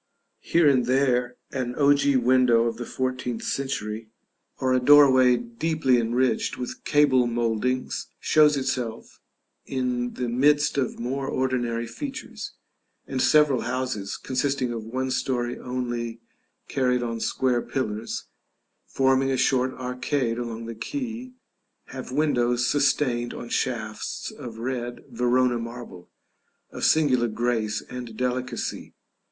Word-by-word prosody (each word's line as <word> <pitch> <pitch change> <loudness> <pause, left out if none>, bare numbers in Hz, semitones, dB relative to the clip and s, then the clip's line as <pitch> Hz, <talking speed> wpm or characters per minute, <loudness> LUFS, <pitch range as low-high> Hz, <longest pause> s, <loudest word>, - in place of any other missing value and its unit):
Here 170 -2 +3
and 130 -4 +3
there 125 -2 +2 0.2
an 125 -2 -3
ogee 140 -1 +4
window 125 -2 +4
of 115 -1 -2
the 120 - -6
fourteenth 130 -2 -3
century, 110 -5 -3 0.5
or 130 0 +1
a 130 - +4
doorway 130 -2 +6
deeply 130 +2 0
enriched 120 +3 0
with 125 - -6
cable 135 -4 +4
mouldings, 120 +2 -1
shows 150 -1 +4
itself 130 -4 -3 0.5
in 125 -2 -2
the 125 - -2
midst 145 +5 +3
of 130 - -1
more 135 +3 -3
ordinary 120 -3 -1
features; 265 - -7 0.5
and 130 -1 -2
several 150 -5 +4
houses, 120 -5 -3
consisting 130 -1 -1
of 115 -2 -5
one 130 +4 -3
story 120 -2 -1
only 120 -2 -4 0.5
carried 125 -2 +1
on 115 -1 -3
square 125 +1 +1
pillars, 110 -5 -3 0.6
forming 135 0 +2
a 135 - +1
short 130 0 +2
arcade 125 -1 -2
along 115 -1 -5
the 115 - -5
quay, 250 - -5 0.6
have 130 -1 -7
windows 125 -4 +1
sustained 130 -3 +1
on 120 - -7
shafts 110 -5 -3
of 115 -2 -9
red 120 0 -4
Verona 125 0 +2
marble, 115 -6 -8 0.6
of - - -7
singular 130 -6 +3
grace 110 -2 -1
and 120 -3 -7
delicacy. 125 -1 -3
125 Hz, 125 wpm, -25 LUFS, 120-130 Hz, 0.6 s, doorway